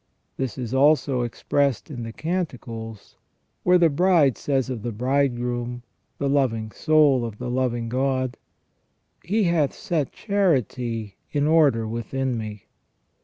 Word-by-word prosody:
This 130 -4 -3
is 125 -2 -4
also 140 -2 +3
expressed 135 +3 -1
in 125 -4 -6
the 115 0 -5
Canticles, 120 - -5 0.4
where 180 0 +5
the 170 -1 +5
bride 165 -4 +4
says 135 -3 -1
of 125 -4 -4
the 120 - -3
bridegroom 120 0 -1 0.2
— - - -47
the 140 - -1
loving 120 -6 +1
soul 150 0 +3
of 115 -3 -5
the 125 +1 -4
loving 120 -2 -1
God: 130 +1 0 0.5
" - - -47
He 210 +6 +1
hath 170 -6 +1
set 155 -6 -2
charity 125 - -1 0.2
in 145 -1 +1
order 150 -8 +4
within 125 +3 -2
me". 105 -3 -6
130 Hz, 140 wpm, -24 LUFS, 120-145 Hz, 0.5 s, where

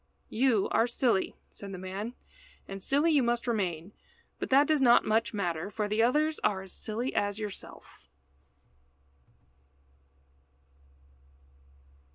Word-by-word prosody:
"You 230 -3 +2
are 225 +2 +2
silly," 235 -4 0
said 200 -1 -10
the - - -5
man, 195 +6 -5 0.5
"and 195 0 -7
silly 290 - +2
you 295 -3 +4
must 240 -1 0
remain, 190 -6 -2 0.5
but - - -4
that 275 +2 +6
does 305 -1 +2
not 240 -2 +6
much 225 +2 +1
matter, 175 -4 -2
for 210 0 -2
the 215 +2 +1
others 300 +6 +2
are 190 -2 +1
as 190 - -8
silly 235 +5 -3
as 205 0 0
yourself." 210 -3 -8
220 Hz, 125 wpm, -29 LUFS, 195-250 Hz, 0.5 s, that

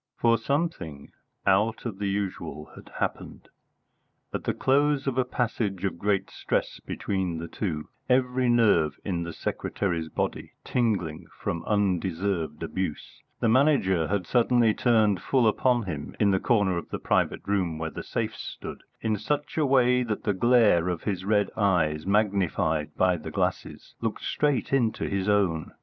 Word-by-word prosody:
For 115 -1 +3
something 125 - -2 0.3
out 105 +5 +2
of 105 -5 -5
the 100 -1 -1
usual 95 -6 -4
had - - -13
happened. - - -4 0.8
At - - -4
the - - +1
close 145 +1 +2
of 135 -3 -1
a 130 - +3
passage 115 -6 -2
of 95 -3 -2
great 100 -1 0
stress - - -2
between 95 -4 -3
the 85 +1 -5
two, 80 -5 -4 0.2
every 125 0 +2
nerve 105 -11 +3
in 90 -4 -1
the 85 0 -4
secretary's 85 -2 -2
body - - -3
tingling 90 -9 -1
from 85 - -3
undeserved 90 -5 -1
abuse, 85 -1 -4 0.2
the - - +3
Manager 110 - +3
had 100 -2 -1
suddenly 120 0 +3
turned 110 -6 +3
full 130 -4 +2
upon 120 +2 +2
him, 75 -7 -6
in 100 -2 +4
the 95 - +2
corner 100 -7 +2
of - - -11
the - - -3
private - - 0
room 95 -5 0
where 80 0 -4
the - - -6
safes - - -3
stood, - - -7 0.2
in 110 -1 0
such 145 +8 -2
a 155 -3 +2
way 125 -1 +4
that 110 -4 -3
the 105 -4 +1
glare 105 -5 +4
of 90 -2 -3
his 95 -3 -2
red 105 -1 +2
eyes, 85 -6 +1
magnified 95 -7 +1
by 90 -1 +3
the 75 - -7
glasses, - - -3
looked - - -3
straight 145 -3 0
into 120 -5 +1
his 100 +1 -1
own. 95 -7 +1
100 Hz, 160 wpm, -27 LUFS, 85-120 Hz, 0.8 s, in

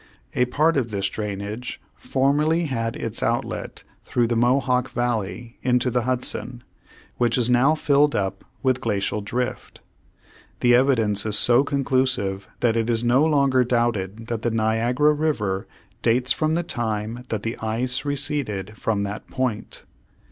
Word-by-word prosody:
A 125 - +2
part 150 +5 +2
of 120 -4 0
this 100 -2 -1
drainage 105 +3 -5
formerly 150 +5 +1
had 115 -4 -2
its 115 -7 -3
outlet 115 +1 -2 0.2
through 120 - +1
the 120 0 0
Mohawk 125 +1 +2
Valley 115 -1 -3
into 125 0 +1
the 125 +1 +1
Hudson, 125 -1 -2 0.5
which 120 0 +2
is 125 0 +4
now 130 +6 +4
filled 145 -1 +3
up 95 -1 -2 0.2
with 130 -2 +1
glacial 105 -1 -1
drift. 120 +5 -4 0.8
The 120 0 +5
evidence 115 -6 +3
is 105 -1 +2
so 120 +2 +4
conclusive 130 -9 0
that 115 -2 +2
it 115 0 0
is 115 0 0
no 125 +4 +4
longer 140 -4 +3
doubted 115 -3 -1
that 115 -1 -3
the 120 - 0
Niagara 115 +6 +2
River 110 -11 -1 0.3
dates 125 +3 +3
from 155 0 +1
the 175 - 0
time 115 -2 -3
that 110 -2 -3
the 115 - -2
ice 125 +4 -1
receded 135 -8 -2
from 105 -2 -1
that 100 +1 -5
point. 130 -5 -3
120 Hz, 150 wpm, -23 LUFS, 110-130 Hz, 0.8 s, The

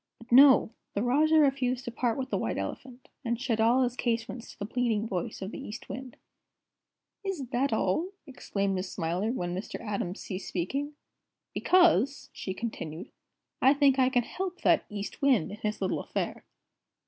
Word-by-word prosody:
But 230 +1 -16
no! 265 -2 +7 0.2
The 205 - +1
Rajah 305 +6 +4
refused 265 -3 +2
to 240 - -4
part 235 -1 0
with 265 0 -4
the - - +1
White - - -2
Elephant, 255 -1 -6 0.2
and 235 -2 -1
shut 245 -4 -1
all 240 +4 +4
his 245 -1 -1
casements 235 -1 -2
to - - -13
the 205 - -4
pleading 225 -1 0
voice 185 -1 -3
of 190 - -5
the - - -7
East 240 -4 -8
Wind." 255 -1 -7 1.1
"Is 380 -9 -3
that 270 +2 +1
all?" 220 - +1 0.2
exclaimed 200 -7 -2
Miss 185 0 -3
Smiler, 175 +7 -1
when 175 -8 -2
Mr. 190 - -5
Atom 200 -4 -3
ceased 190 -1 -6
speaking. 275 - -2 0.6
"Because," 295 - +3
she 190 - -5
continued, 180 -7 -5 0.5
"I 270 +2 +6
think 275 -2 +4
I 255 0 +5
can 245 -2 +2
help 370 +7 -5
that 335 -3 +4
East 205 +5 -6
Wind 260 - +3
in 205 - -7
his 215 -1 -3
little 190 - 0
affair." - - -4
240 Hz, 175 wpm, -29 LUFS, 205-270 Hz, 1.1 s, no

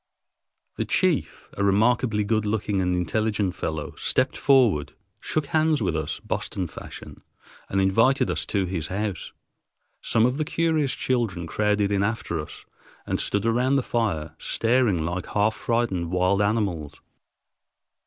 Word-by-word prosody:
The - - -1
chief, - - 0
a 100 - 0
remarkably 105 +2 +2
good 110 +1 +1
looking 105 -2 -1
and 90 -1 +1
intelligent 105 +2 0
fellow, 80 -4 -4
stepped 130 +1 0
forward, 115 - +3 0.2
shook 155 -2 -2
hands 155 +1 +2
with 90 -7 -1
us 80 -2 -3
Boston 90 -2 -3
fashion, - - -10 0.5
and 95 - 0
invited 115 +8 +3
us - - -2
to 100 -2 0
his 85 -4 -3
house. 100 0 -3 0.7
Some 110 0 +2
of 125 +2 +1
the - - +2
curious 160 -3 0
children 115 -9 -1
crowded 105 +3 +1
in 100 -1 +2
after 100 -5 -1
us 75 - -8 0.4
and - - -1
stood 100 +1 -1
around 125 +4 +2
the 135 - +2
fire 80 -11 -1
staring 115 -8 +1
like 85 +2 -3
half 105 +1 +1
frightened 110 -7 -1
wild 90 +2 +2
animals. 100 -8 -1
105 Hz, 145 wpm, -25 LUFS, 90-120 Hz, 0.7 s, forward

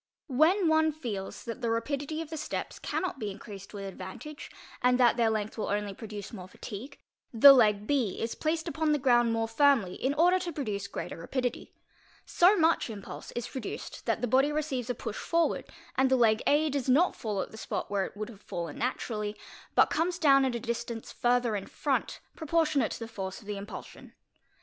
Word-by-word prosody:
When 325 +7 +3
one 315 0 +4
feels 230 -11 -5
that 230 +2 -6
the 235 - 0
rapidity 280 +7 -2
of 315 - -14
the - - -3
steps 310 0 -4
cannot 365 -7 -3
be 210 - -3
increased 195 -1 -9
with 200 -2 -7
advantage, 195 - -8 0.3
and 250 0 +3
that 240 -2 +5
their 235 -2 +3
length 215 0 -2
will - - -1
only 205 0 -1
produce 210 -1 -8
more 185 -4 -8
fatigue, 215 +8 -8 0.3
the 275 +4 +10
leg 210 -5 +4
B 250 -7 0
is 230 - -2
placed 320 +2 -1
upon 315 -2 +1
the - - +3
ground 240 -4 +4
more 225 0 0
firmly 230 -5 +3
in 270 +7 -1
order 355 +4 +4
to 355 -1 -4
produce 210 -10 -3
greater - - -6
rapidity; 245 +9 -3 0.5
so 370 +4 +5
much 325 -6 +3
impulse 205 -4 -8
is 240 0 -3
produced 260 -6 -7
that - - +1
the 245 - 0
body 270 +5 +3
receives 280 -5 -2
a 245 - 0
push 215 - -5
forward 335 0 +1 0.3
and 265 0 +3
the 260 - +4
'leg 220 -2 +4
A 300 +1 +3
does 275 -2 -2
not 320 +8 +4
fall 210 -3 -3
at - - -3
the - - -11
spot - - -4
where 195 -2 +1
it - - -14
would 215 +1 -4
have 215 -4 -13
fallen 170 -6 -5
naturally, 215 -4 -2 0.4
but - - +5
comes 340 +2 0
down 275 -5 +5
at 255 -2 -1
a - - -2
distance 235 -1 -4
further 245 -2 +1
in 195 - -4
front - - -2
proportionate 315 -5 +1
to - - -7
the 230 - -5
force 190 -3 -6
of 220 - -17
"the 205 0 -4
impulsion. 200 +2 -9
245 Hz, 200 wpm, -29 LUFS, 210-295 Hz, 0.5 s, the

